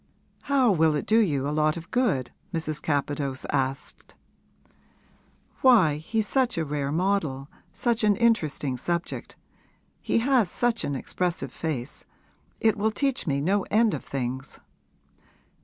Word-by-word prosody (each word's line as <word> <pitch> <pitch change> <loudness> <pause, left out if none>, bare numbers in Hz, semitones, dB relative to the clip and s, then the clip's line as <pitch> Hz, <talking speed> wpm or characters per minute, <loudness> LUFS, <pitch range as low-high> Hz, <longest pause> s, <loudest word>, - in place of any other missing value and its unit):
'How 265 -5 +3
will 160 -4 +3
it 145 - -2
do 220 +3 +4
you 145 -10 +1
a - - -1
lot 155 +1 +1
of 165 - -10
good?' 205 - +1 0.2
Mrs. 155 -3 -2
Capadose 145 -2 -2
asked. 135 0 -3 1.5
'Why, 200 - +5
he's 210 +7 -2
such 260 -6 +1
a 165 - 0
rare 145 -1 -2
model 155 -6 -1 0.2
such 225 +4 0
an 210 -1 +4
interesting 155 - +1
subject. 170 +6 -3 0.7
He - - 0
has 240 -4 +3
such 240 +4 0
an 145 - -2
expressive 170 -1 -2
face. 145 -5 -4 0.6
It 220 -1 +2
will 215 +2 +2
teach 270 0 -1
me 140 -1 0
no 195 +6 +2
end 220 0 +3
of - - -4
things.' 130 0 -4
165 Hz, 140 wpm, -26 LUFS, 145-220 Hz, 1.5 s, Why